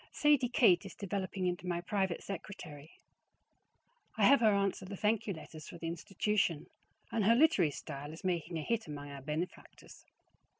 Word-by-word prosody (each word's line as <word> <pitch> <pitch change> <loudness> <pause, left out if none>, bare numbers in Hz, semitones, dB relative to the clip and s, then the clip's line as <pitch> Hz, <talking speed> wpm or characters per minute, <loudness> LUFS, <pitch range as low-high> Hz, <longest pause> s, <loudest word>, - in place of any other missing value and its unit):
Sadie 295 -5 +3
Kate 185 -9 +5
is - - -9
developing 195 -1 -3
into 180 0 -2
my 175 -1 0
private 190 -1 -1
secretary. 160 -6 -8 1.3
I - - +2
have 280 - +7
her 220 -2 +5
answer 200 -1 0
the 195 +1 -7
thank 220 +2 +1
you 200 - -1
letters 155 -1 -10
for - - -9
the 165 - -7
institution, 175 0 0 0.5
and 225 - +1
her 225 +4 +5
literary 245 - +5
style 145 0 -7
is 160 - -11
making 175 -2 -1
a 155 - -3
hit 230 -1 -1
among 145 -1 -7
our 140 -1 -8
benefactors. 155 +6 -6
180 Hz, 170 wpm, -33 LUFS, 160-210 Hz, 1.3 s, have